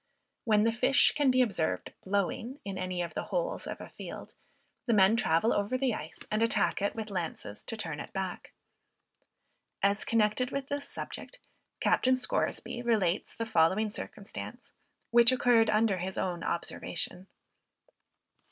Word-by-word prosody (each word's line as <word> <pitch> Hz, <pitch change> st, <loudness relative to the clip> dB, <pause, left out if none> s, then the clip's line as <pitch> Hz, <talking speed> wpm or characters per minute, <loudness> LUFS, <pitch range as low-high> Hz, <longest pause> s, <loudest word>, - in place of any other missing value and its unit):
When 210 Hz, -2 st, +4 dB
the 230 Hz, -, +3 dB
fish 255 Hz, +4 st, +4 dB
can 290 Hz, -2 st, +3 dB
be 255 Hz, 0 st, +5 dB
observed 190 Hz, -9 st, -2 dB
"blowing" 200 Hz, +7 st, -1 dB
in 195 Hz, -1 st, -4 dB
any 185 Hz, -1 st, -2 dB
of 170 Hz, -, -6 dB
the -, -, -3 dB
holes -, -, -2 dB
of -, -, -5 dB
a -, -, -9 dB
field, -, -, -9 dB, 0.5 s
the 235 Hz, -, +3 dB
men 195 Hz, +2 st, +6 dB
travel 190 Hz, 0 st, +2 dB
over 205 Hz, +5 st, 0 dB
the 255 Hz, -2 st, +1 dB
ice 160 Hz, -5 st, -7 dB
and 215 Hz, +1 st, +1 dB
attack 230 Hz, -2 st, +2 dB
it 200 Hz, -, 0 dB
with 220 Hz, -2 st, -5 dB
lances 165 Hz, -, -4 dB
to 225 Hz, -, -5 dB
turn 160 Hz, -8 st, -4 dB
it -, -, -7 dB
back. 190 Hz, -2 st, -4 dB, 1.3 s
As 200 Hz, +1 st, +3 dB
connected 230 Hz, +2 st, +2 dB
with 275 Hz, 0 st, -4 dB
this 285 Hz, 0 st, -3 dB
subject, -, -, -7 dB, 0.4 s
Captain 255 Hz, 0 st, +3 dB
Scoresby 245 Hz, -1 st, -1 dB
relates 210 Hz, -6 st, +1 dB
the 230 Hz, -, -3 dB
following 190 Hz, +3 st, +3 dB
circumstance, 210 Hz, -, -7 dB, 0.4 s
which 235 Hz, 0 st, +7 dB
occurred 240 Hz, -3 st, +4 dB
under 215 Hz, -3 st, +2 dB
his 185 Hz, +2 st, -4 dB
own 175 Hz, -2 st, -2 dB
observation. 175 Hz, +2 st, -3 dB
215 Hz, 150 wpm, -30 LUFS, 185-240 Hz, 1.3 s, which